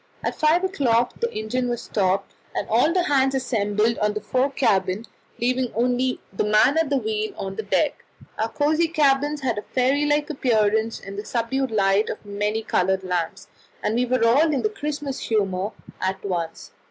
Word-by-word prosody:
At -, -, -1 dB
five 315 Hz, +4 st, +2 dB
o'clock 250 Hz, -11 st, +1 dB
the 470 Hz, 0 st, -1 dB
engine 245 Hz, +4 st, -2 dB
was 240 Hz, -1 st, -3 dB
stopped, 195 Hz, -1 st, 0 dB, 0.2 s
and -, -, -2 dB
all 245 Hz, +8 st, +4 dB
hands 270 Hz, -4 st, +2 dB
assembled 225 Hz, -3 st, 0 dB
in 210 Hz, 0 st, +2 dB
the -, -, -1 dB
fore 255 Hz, +5 st, 0 dB
cabin, 210 Hz, -6 st, +1 dB, 0.3 s
leaving 250 Hz, +1 st, 0 dB
only 250 Hz, +2 st, +1 dB
the -, -, 0 dB
man 215 Hz, +8 st, +4 dB
at 325 Hz, -3 st, +1 dB
the 280 Hz, -, +2 dB
wheel 430 Hz, +4 st, -2 dB
on 190 Hz, 0 st, -4 dB
deck. 220 Hz, +8 st, -1 dB, 0.4 s
Our 220 Hz, +1 st, 0 dB
cosy 305 Hz, +5 st, +2 dB
cabins 290 Hz, -2 st, +2 dB
had 240 Hz, -5 st, -1 dB
a -, -, -13 dB
fairy 265 Hz, +3 st, +3 dB
like 295 Hz, +1 st, +1 dB
appearance 220 Hz, -4 st, +1 dB
in 195 Hz, 0 st, -9 dB
the 205 Hz, -, -4 dB
subdued 255 Hz, +4 st, -1 dB
light 200 Hz, -1 st, +2 dB
of -, -, -3 dB
the 205 Hz, -, -14 dB
many 210 Hz, +2 st, -1 dB
coloured 190 Hz, -2 st, +1 dB
lamps, 175 Hz, -3 st, -3 dB, 0.4 s
and 210 Hz, -, 0 dB
we 245 Hz, +2 st, +1 dB
were 250 Hz, -2 st, +2 dB
all 285 Hz, +8 st, +4 dB
in 280 Hz, -, 0 dB
the 430 Hz, -, +2 dB
Christmas 295 Hz, -8 st, -4 dB
humour 195 Hz, -3 st, 0 dB, 0.3 s
at 190 Hz, +1 st, -2 dB
once. 170 Hz, -4 st, -4 dB
240 Hz, 180 wpm, -23 LUFS, 210-280 Hz, 0.4 s, all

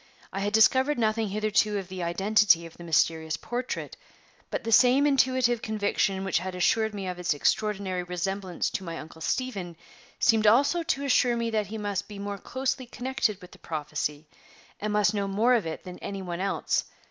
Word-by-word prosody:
I -, -, -3 dB
had 205 Hz, +1 st, -1 dB
discovered 260 Hz, +6 st, +4 dB
nothing 220 Hz, -1 st, +1 dB
hitherto 215 Hz, 0 st, +1 dB
of 195 Hz, -2 st, -5 dB
the 185 Hz, 0 st, -6 dB
identity 190 Hz, 0 st, +3 dB
of 165 Hz, -, -12 dB
the 175 Hz, -, -11 dB
mysterious 160 Hz, -1 st, +1 dB
portrait; 245 Hz, +2 st, -4 dB, 0.5 s
but -, -, -3 dB
the 225 Hz, -, -3 dB
same 255 Hz, +5 st, +6 dB
intuitive 255 Hz, -4 st, +2 dB
conviction 205 Hz, -2 st, 0 dB
which 190 Hz, -4 st, +1 dB
had 185 Hz, +1 st, -5 dB
assured 220 Hz, +4 st, +1 dB
me 195 Hz, -2 st, -4 dB
of 180 Hz, -1 st, -5 dB
its 175 Hz, -4 st, 0 dB
extraordinary 195 Hz, +2 st, 0 dB
resemblance 180 Hz, +1 st, -3 dB
to -, -, -3 dB
my 165 Hz, -2 st, -5 dB
Uncle 160 Hz, +1 st, -10 dB
Stephen 195 Hz, -6 st, -3 dB, 0.4 s
seemed 220 Hz, -2 st, +3 dB
also 280 Hz, +10 st, +4 dB
to 285 Hz, -4 st, -1 dB
assure 250 Hz, -3 st, +3 dB
me 230 Hz, 0 st, -1 dB
that 215 Hz, -2 st, 0 dB
he 220 Hz, -, -6 dB
must 205 Hz, -2 st, -3 dB
be 210 Hz, -, -9 dB
more 200 Hz, 0 st, -5 dB
closely 260 Hz, +1 st, -3 dB
connected 245 Hz, -5 st, -1 dB
with 180 Hz, -, -12 dB
the -, -, -15 dB
prophecy, 150 Hz, -1 st, -4 dB, 0.5 s
and 210 Hz, +1 st, -2 dB
must 210 Hz, 0 st, +3 dB
know 200 Hz, -1 st, -1 dB
more 215 Hz, +6 st, +3 dB
of 225 Hz, -8 st, +1 dB
it 160 Hz, -, -5 dB
than 180 Hz, -1 st, -9 dB
any 195 Hz, -1 st, -5 dB
one 175 Hz, -1 st, -5 dB
else. 195 Hz, +1 st, 0 dB
205 Hz, 190 wpm, -27 LUFS, 180-230 Hz, 0.5 s, same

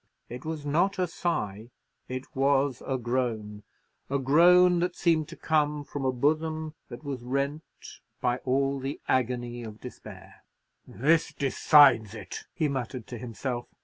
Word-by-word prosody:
It 125 Hz, +2 st, -7 dB
was 155 Hz, -2 st, -4 dB
not 175 Hz, +7 st, +1 dB
a 185 Hz, -, +2 dB
sigh, 120 Hz, -, -3 dB, 0.4 s
it 130 Hz, 0 st, -6 dB
was 135 Hz, -1 st, +2 dB
a 135 Hz, -, 0 dB
groan—a 120 Hz, 0 st, -4 dB
groan 175 Hz, +6 st, +5 dB
that 180 Hz, +1 st, -1 dB
seemed 160 Hz, -3 st, +2 dB
to 170 Hz, -, -9 dB
come 150 Hz, -2 st, 0 dB
from 140 Hz, -1 st, -5 dB
a 130 Hz, -, +3 dB
bosom 155 Hz, +4 st, 0 dB, 0.2 s
that 120 Hz, +2 st, -9 dB
was 140 Hz, -4 st, -5 dB
rent 140 Hz, +4 st, -2 dB, 0.6 s
by 120 Hz, 0 st, +1 dB
all 135 Hz, +2 st, 0 dB
the 135 Hz, +2 st, -4 dB
agony 120 Hz, -1 st, -1 dB
of 110 Hz, -2 st, -9 dB
despair. 125 Hz, -, -11 dB, 0.5 s
"This 155 Hz, +5 st, +2 dB
decides 135 Hz, -6 st, +5 dB
it!" 105 Hz, -4 st, -8 dB
he 160 Hz, -4 st, 0 dB
muttered 130 Hz, -3 st, -4 dB
to 120 Hz, -, -8 dB
himself. 120 Hz, +1 st, -4 dB
135 Hz, 145 wpm, -28 LUFS, 120-155 Hz, 0.6 s, groan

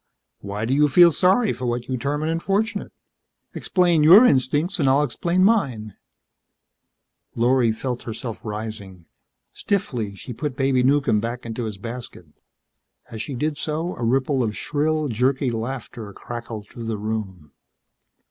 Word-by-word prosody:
Why 100 Hz, +2 st, -4 dB
do 125 Hz, -, 0 dB
you 150 Hz, +2 st, +4 dB
feel 170 Hz, +4 st, +6 dB
sorry 195 Hz, -, +3 dB
for 125 Hz, -, -5 dB
what 120 Hz, 0 st, -2 dB
you 130 Hz, -, -2 dB
term 140 Hz, +5 st, -2 dB
an 155 Hz, -, -1 dB
unfortunate? 195 Hz, +7 st, -1 dB, 0.6 s
Explain 175 Hz, -4 st, +2 dB
your 185 Hz, +11 st, +8 dB
instincts 150 Hz, -, +1 dB
and 140 Hz, -3 st, +3 dB
I'll 140 Hz, +2 st, +4 dB
explain 170 Hz, +7 st, 0 dB
mine." 130 Hz, -, +1 dB, 1.4 s
Lorry 120 Hz, 0 st, +3 dB
felt 125 Hz, +2 st, -4 dB
herself 115 Hz, +1 st, -7 dB
rising. 105 Hz, -5 st, -7 dB, 0.5 s
Stiffly, 125 Hz, -, -2 dB
she 125 Hz, -, -8 dB
put 145 Hz, +2 st, -4 dB
Baby 135 Hz, -2 st, +2 dB
Newcomb 135 Hz, -4 st, +2 dB
back 115 Hz, +3 st, -5 dB
into 115 Hz, +1 st, -4 dB
his 105 Hz, -3 st, -5 dB
basket. 115 Hz, -3 st, -8 dB, 0.9 s
As 110 Hz, -, -5 dB
she 140 Hz, -, -5 dB
did 150 Hz, +4 st, -2 dB
so, 160 Hz, +3 st, -2 dB
a -, -, -9 dB
ripple 130 Hz, +3 st, +1 dB
of 110 Hz, -3 st, -2 dB
shrill, 155 Hz, +1 st, -1 dB
jerky 130 Hz, +2 st, 0 dB
laughter 115 Hz, -2 st, -5 dB
crackled 115 Hz, -3 st, -7 dB
through 115 Hz, +1 st, -9 dB
the 110 Hz, -1 st, -2 dB
room. 100 Hz, -7 st, -5 dB
130 Hz, 145 wpm, -22 LUFS, 110-150 Hz, 1.4 s, your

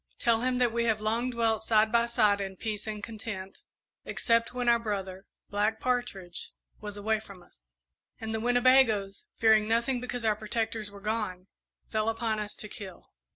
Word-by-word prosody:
"Tell 230 Hz, -2 st, +2 dB
him 255 Hz, 0 st, +1 dB
that 245 Hz, -2 st, +2 dB
we 235 Hz, 0 st, +1 dB
have 220 Hz, -2 st, +2 dB
long 225 Hz, +4 st, 0 dB
dwelt 230 Hz, -3 st, +1 dB
side 220 Hz, 0 st, +3 dB
by 235 Hz, 0 st, +3 dB
side 210 Hz, -4 st, +3 dB
in 195 Hz, -1 st, -4 dB
peace 215 Hz, 0 st, -4 dB
and 210 Hz, -1 st, -4 dB
content, 210 Hz, -4 st, -6 dB, 0.4 s
except 230 Hz, -1 st, +1 dB
when 245 Hz, -1 st, -3 dB
our 235 Hz, 0 st, +5 dB
brother, 195 Hz, -3 st, -4 dB, 0.2 s
Black 210 Hz, +2 st, +1 dB
Partridge, 220 Hz, -8 st, -2 dB, 0.3 s
was 205 Hz, -1 st, -7 dB
away 215 Hz, +1 st, +1 dB
from 200 Hz, -4 st, -13 dB
us, 60 Hz, -, -22 dB, 0.5 s
and 220 Hz, 0 st, -4 dB
the 220 Hz, -, -1 dB
Winnebagoes, 240 Hz, -4 st, +3 dB
fearing 220 Hz, -1 st, +5 dB
nothing 235 Hz, +3 st, +1 dB
because 245 Hz, -1 st, -4 dB
our 215 Hz, -1 st, +3 dB
protectors 220 Hz, 0 st, -2 dB
were 200 Hz, 0 st, -12 dB
gone, 210 Hz, -4 st, -2 dB, 0.5 s
fell 215 Hz, 0 st, +1 dB
upon 225 Hz, -1 st, -1 dB
us 210 Hz, 0 st, -4 dB
to 210 Hz, -, -7 dB
kill. 195 Hz, -3 st, -9 dB
220 Hz, 175 wpm, -29 LUFS, 205-235 Hz, 0.5 s, our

